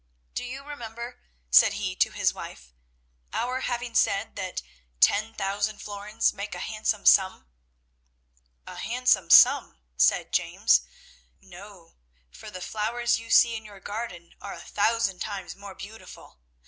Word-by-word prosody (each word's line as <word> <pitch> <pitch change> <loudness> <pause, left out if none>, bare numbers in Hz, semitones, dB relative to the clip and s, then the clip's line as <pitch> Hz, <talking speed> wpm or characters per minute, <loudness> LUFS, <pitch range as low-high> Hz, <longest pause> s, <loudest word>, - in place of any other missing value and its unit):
Do - - -3
you 260 +3 -7
remember," 240 -4 -8 0.3
said 200 - +7
he 200 -2 -3
to - - +3
his - - 0
wife, - - -10 0.6
"our 255 +2 -2
having 240 -2 -3
said 205 -1 +1
that 190 -2 -5 0.4
ten 215 - +3
thousand 200 +2 -2
florins 205 +1 -1
make 200 +1 -6
a - - -6
handsome 215 -1 -2
sum. 190 - +4 1.2
'A - - -10
handsome 235 -7 +1
sum!' - - +6 0.2
said 60 - +3
James, - - +3 0.6
'no; 190 -1 -14 0.4
for 215 - -11
the 185 -3 -9
flowers 230 +5 -1
you 230 0 -12
see 235 -1 +5
in 220 - -6
your 205 -2 -13
garden 195 -4 -7
are 200 - -7
a - - -10
thousand 210 -3 0
times 195 -2 -5
more 200 -1 -11
beautiful. 210 - -12
210 Hz, 140 wpm, -26 LUFS, 195-230 Hz, 1.2 s, said